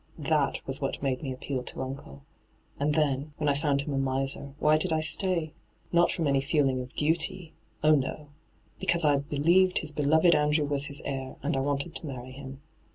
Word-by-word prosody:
That - - 0
was - - -3
what - - -3
made 130 -2 0
me 135 - -4
appeal 130 0 -4
to 125 - -4
uncle. 130 - -8 0.6
And 150 +1 +1
then, 145 -1 0
when 150 - -1
I 145 - +4
found 140 -1 +1
him 145 - -4
a 135 - 0
miser, 135 +1 -2
why 155 0 +3
did 180 +1 -2
I 160 0 +2
stay? 165 -1 0 0.4
Not 170 0 +4
from 165 - -1
any 140 -1 +2
feeling 135 -3 +1
of 125 0 -10
duty 160 +2 0 0.2
— - - -33
oh 155 0 +6
no 135 -3 +1
I 150 - -15 0.5
Because 170 -2 +1
I 145 -1 +4
believed 165 +6 +3
his 155 - -2
beloved 160 +4 +4
Andrew 150 0 +2
was 145 0 0
his 140 - -7
heir, 135 -1 -4
and - - 0
I - - +1
wanted 140 +4 -1
to 165 - -1
marry 130 -2 -7
him. 135 +1 -9
145 Hz, 210 wpm, -28 LUFS, 135-155 Hz, 0.6 s, oh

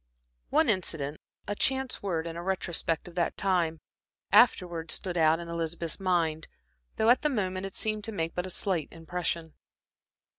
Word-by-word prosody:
One 320 - +3
incident, 160 - 0 0.3
a 205 - 0
chance 265 +4 +1
word, 170 -5 -1
in 165 -1 -5
a 170 - -5
retrospect 175 -3 -1
of 175 - -10
that 170 -1 -1
time, 170 -4 +1 0.5
afterwards 175 -8 +4
stood 180 -3 -3
out 160 -1 +4
in 170 - -7
Elizabeth's 170 0 -3
mind, 170 -4 0 0.5
though 220 +2 +4
at 250 - +4
the 300 - +2
moment 190 -6 -1
it 195 - -10
seemed 215 -1 0
to 225 - +1
make 165 -5 -2
but 180 +1 -2
a - - -6
slight 180 -4 -1
impression. 165 -1 -3
175 Hz, 165 wpm, -29 LUFS, 165-195 Hz, 0.5 s, afterwards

